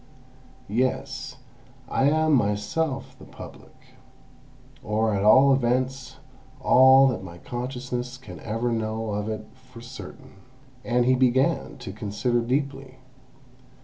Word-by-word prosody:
Yes, 125 +5 -2 0.5
I 135 - +1
am 155 0 +2
myself 130 +6 -1
the - - -12
Public; - - -13 1.1
or 110 +1 0
at 100 0 0
all 135 +6 +6
events 130 +1 -1 0.4
all 130 +1 +6
that 100 -7 -4
my 85 -2 -10
consciousness 125 +2 -5
can 130 - -11
ever 115 +3 -2
know 110 -1 -2
of 105 +1 -3
it 110 0 -5
for 130 -2 -16
certain." 115 -6 -11 0.5
And 120 0 +1
he 130 - +4
began 130 +4 +1
to 110 -7 -8
consider 110 +3 -1
deeply. 135 +1 -3
125 Hz, 115 wpm, -25 LUFS, 110-130 Hz, 1.1 s, all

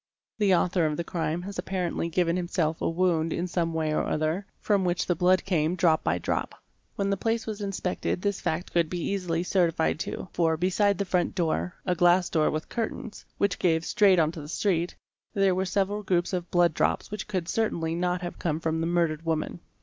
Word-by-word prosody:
The 200 -3 +4
author 175 -1 +2
of 150 -1 -2
the 170 - -1
crime 165 0 -2
had 200 +1 -6
apparently 180 -3 -2
given 170 0 +1
himself 170 -3 -1
a - - +1
wound 165 -2 +1
in 170 - -1
some 170 -2 -1
way 160 -1 -1
or - - +1
other, 155 +6 -1
from 200 -3 +1
which 175 -1 0
the 175 - +2
blood 180 +2 +3
came 170 -2 +1
drop 170 -3 +3
by 85 - +1
drop. 90 - -2 0.4
When 200 0 0
the 195 - +1
place 225 +3 -1
was 215 -1 -5
inspected 195 -3 -2
this 200 -1 -1
fact 160 +3 -2
could 170 -2 +2
be 180 - -3
easily 175 -2 -1
certified 170 -4 +1
to, 185 - -4
for, 165 -2 +2
beside 190 +3 +2
the 200 - -1
front 180 -2 0
door 175 +1 -1
(a 180 - +2
glass 175 +1 +3
door 155 -2 +3
with 155 +1 -3
curtains) 225 -1 -5
which 200 -2 0
gave 165 -2 +2
straight 200 -5 +4
on 160 -2 +3
to 165 - -8
the 145 - -9
street, 175 -1 0 0.4
there 195 -2 +3
were 190 +1 0
several 200 +2 0
groups 185 -2 0
of 180 -1 -2
blood 175 -2 +3
drops - - 0
which 210 -1 -5
could 185 -5 -2
certainly 170 -6 0
not 180 +1 0
have 175 - -6
come 160 -2 -1
from 160 0 -1
the 165 - 0
murdered 170 -2 +1
woman. 165 +1 -2
175 Hz, 210 wpm, -27 LUFS, 165-190 Hz, 0.4 s, The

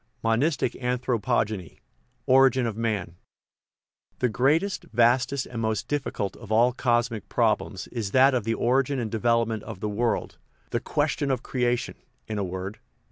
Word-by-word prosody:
Monistic 120 +5 +1
Anthropogeny 120 -6 -1 0.5
Origin 130 -1 +5
of 115 -3 -2
Man 105 -7 -2 1.0
'""THE 125 - +1
greatest, 155 - +1
vastest, 125 +4 +2
and 115 -2 -5
most 110 -1 -1
difficult 135 -8 -2
of 110 -3 -11
all 120 +3 +4
cos 120 -1 +1
mic 105 -3 -7
problems 110 -4 0
is 115 -5 -3
that 130 +5 +5
of 125 -4 +1
the 115 +1 0
origin 135 +3 +1
and 115 -4 -3
develop 115 0 +2
ment 110 -2 -3
of 95 - -8
the 105 - -2
world 115 +3 -1 0.3
the - - 0
"question 140 - -1
of 130 -2 -1
creation," 125 -2 -1 0.3
in 110 -1 -3
a - - 0
word. 95 +2 -5
120 Hz, 155 wpm, -26 LUFS, 110-130 Hz, 1.0 s, Origin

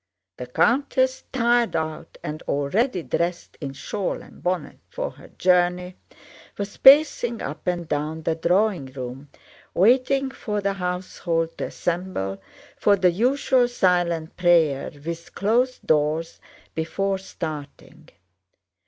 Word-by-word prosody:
The 125 - -6
countess, 260 - +1
tired 240 -4 +2
out 160 -1 -4
and 155 +1 -5
already 180 - 0
dressed 170 +2 -2
in 140 -2 -4
shawl 195 +7 -3
and - - -16
bonnet 180 -4 -2
for - - -4
her - - -15
journey, 180 0 +1 0.6
was 200 0 -4
pacing 265 -5 +6
up 150 +6 -6
and 175 -2 -1
down 155 +2 -2
the 165 - +1
drawing 175 -1 +1
room, 130 +1 -8 0.5
waiting 260 +6 +3
for 210 -5 -3
the 200 0 0
household 180 -3 -2
to - - -1
assemble 170 - -3 0.4
for 205 - +4
the 185 -2 +3
usual 250 +5 +2
silent 175 -7 +1
prayer 165 -6 +3 0.2
with 170 0 -6
closed 245 +5 +1
doors 155 +2 +1 0.3
before 195 +4 -1
starting. 155 -6 -8
180 Hz, 120 wpm, -24 LUFS, 160-215 Hz, 0.6 s, pacing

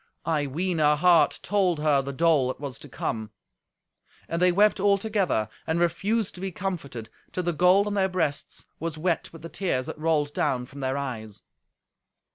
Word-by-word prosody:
I 150 -3 0
ween 170 +5 -1
her 150 -1 +4
heart 170 +1 +4
told 185 -6 +1
her 150 -2 +3
the 135 +1 -5
dole 155 -2 +3
that 130 - -4
was 140 -4 -6
to - - -11
come. 110 -1 -3 1.0
And 170 +1 -2
they 180 0 +5
wept 205 +3 +3
all 200 +1 +4
together, 195 - 0 0.2
and 160 +1 0
refused 195 +6 0
to 180 - -9
be 195 0 -3
comforted, 155 - -5 0.2
till 180 - -2
the 175 0 0
gold 180 +5 +4
on 210 - -2
their 190 -1 +2
breasts 165 -6 -2
was 165 0 -4
wet 170 +1 -1
with 165 -1 -13
the - - -5
tears 145 -11 -1
that - - -7
rolled 155 -2 +1
down 125 -4 0
from 140 +3 -12
their 135 0 -1
eyes. 110 -7 -5
165 Hz, 190 wpm, -26 LUFS, 140-185 Hz, 1.0 s, they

